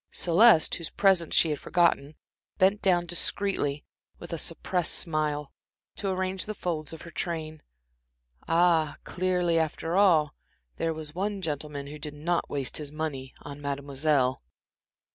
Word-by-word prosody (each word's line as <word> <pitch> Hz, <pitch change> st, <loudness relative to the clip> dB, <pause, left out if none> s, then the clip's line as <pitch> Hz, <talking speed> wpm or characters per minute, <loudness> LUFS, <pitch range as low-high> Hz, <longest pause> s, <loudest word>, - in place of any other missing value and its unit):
Celeste, 175 Hz, 0 st, +5 dB
whose 165 Hz, -1 st, -3 dB
presence 190 Hz, -5 st, +2 dB
she 160 Hz, -, +4 dB
had 150 Hz, -, -2 dB
forgotten, 165 Hz, -4 st, +1 dB, 0.4 s
bent 195 Hz, +3 st, +3 dB
down 175 Hz, -2 st, +3 dB
discreetly, 170 Hz, -4 st, -1 dB, 0.3 s
with 170 Hz, -, -9 dB
a 165 Hz, -, 0 dB
suppressed 175 Hz, +1 st, 0 dB
smile, 150 Hz, -3 st, -1 dB, 0.4 s
to 200 Hz, -, -3 dB
arrange 185 Hz, +1 st, -1 dB
the 215 Hz, -, -4 dB
folds 160 Hz, -5 st, -3 dB
of 160 Hz, -, -9 dB
her 170 Hz, -, -10 dB
train. 160 Hz, -2 st, -4 dB, 0.9 s
Ah, 165 Hz, -3 st, +3 dB
clearly, 180 Hz, -2 st, 0 dB
after 160 Hz, +1 st, -2 dB
all, 170 Hz, -7 st, +4 dB, 0.4 s
there 165 Hz, -, 0 dB
was 155 Hz, -1 st, -7 dB
one 200 Hz, +3 st, -2 dB
gentleman 150 Hz, -4 st, -4 dB
who 150 Hz, +2 st, -9 dB
did 150 Hz, -1 st, -6 dB
not 170 Hz, +4 st, -1 dB
waste 140 Hz, -3 st, -1 dB
his 150 Hz, -2 st, -5 dB
money 145 Hz, -4 st, -4 dB
on 145 Hz, 0 st, -9 dB
Mademoiselle. 140 Hz, -1 st, 0 dB
160 Hz, 145 wpm, -27 LUFS, 150-180 Hz, 0.9 s, Celeste